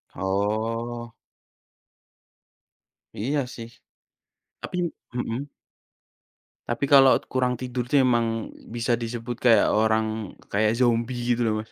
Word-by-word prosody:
Oh. 110 +5 -2 2.0
Iya 140 +8 0 0.2
sih. 115 -1 -8 0.9
Tapi, - - -6 0.4
mhm. 120 +1 -2 1.3
Tapi 120 +4 0
kalau 135 -1 +7
kurang 125 -1 0
tidur 125 0 -3
tuh 135 -1 +4
emang, 115 -2 0 0.2
bisa 120 0 0
disebut 120 +1 -3
kayak 120 -3 +5
orang, 110 -1 0
kayak 110 +2 +2
zombie 120 0 +1 0.2
gitu 120 - -2
loh 110 - +2
Mas. 110 - -14
115 Hz, 100 wpm, -25 LUFS, 110-125 Hz, 2.0 s, kalau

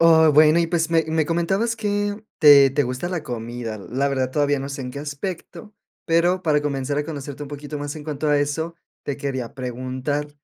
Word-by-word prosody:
Oh, 160 -1 +6
bueno, 155 +2 +6
y 170 - +1
pues, 165 -1 0
me 165 -1 +3
me 160 -1 +1
comentabas 195 +8 0
que 205 -1 -2 0.2
te 140 -3 +8
te 145 +2 +1
gusta 125 +7 -3
la 175 -3 -3
comida. 115 -3 -5
La 130 +7 -1
verdad, 130 -2 -1
todavía 145 0 +1
no 135 - -5
sé 140 -1 -5
en 125 - -5
qué 140 - -6
aspecto, 170 +7 -6 0.3
pero 175 +2 +2
para 150 -3 +2
comenzar 140 -1 -2
a 150 - -1
conocerte 145 -2 -6
un 145 - -7
poquito 145 +1 -6
más 145 +1 -5
en 150 - -9
cuanto 150 0 -2
a 145 - +4
eso, 160 +4 -2 0.3
te 140 - -3
quería 135 -4 -4
preguntar, 130 +3 -3
145 Hz, 205 wpm, -22 LUFS, 135-165 Hz, 0.3 s, te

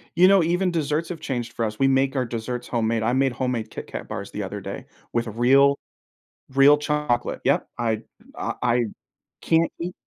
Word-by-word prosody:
You 180 +2 +7
know, 195 -2 +6
even 180 +2 +1
desserts 155 0 -1
have 170 -3 -5
changed 120 -3 -4
for 115 - -1
us, 105 0 -5
we 135 - +4
make 135 +1 +2
our 130 -1 +1
desserts 120 +1 -4
homemade, 115 -1 0
I 120 +2 +1
made 135 0 +2
homemade 120 -3 -2
KitKat - - -7
bars - - -6
the - - -4
other - - -5
day - - -7 0.3
with 120 0 0
real 135 +5 +4 0.8
real 140 +2 +7
chocolate. 150 -5 -1
Yep. - - +2
I 115 -2 -1 0.3
I - - -3
I 120 0 +2 0.6
can't 165 0 +2
eat 175 +2 -4
130 Hz, 185 wpm, -24 LUFS, 120-150 Hz, 0.8 s, You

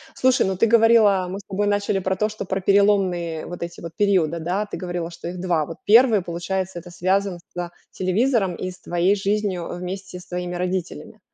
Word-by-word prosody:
Слушай, 260 0 +3
ну 190 0 -1
ты 230 - +3
говорила, 220 -4 +5
мы 190 +2 -5
с 200 - -14
тобой 205 +1 -1
начали 205 -1 +1
про 190 0 -1
то, 210 +3 0
что 215 -1 -6
про 190 +1 -2
переломные 190 -5 +2
вот 175 - -8
эти 170 0 -7
вот 170 -1 -8
периоды, 180 -6 +2
да, 185 +6 -2
говорила, 175 -2 -4
что 170 - -8
их 180 +1 -7
2. 170 -4 +1
Вот 165 +2 -8
1, 225 -1 +6
получается, 175 +1 -3
это 175 +1 -12
связано 185 +1 0
со 175 -1 -4 0.2
телевизором 195 0 +1
и 185 - -4
с 180 - -15
твоей 175 +3 +1
жизнью, 200 -3 -1
а, - - -4
вместе 180 +1 -6
с 180 - -15
твоими 180 0 -4
родителями. 180 - -4
185 Hz, 200 wpm, -22 LUFS, 175-200 Hz, 0.2 s, 1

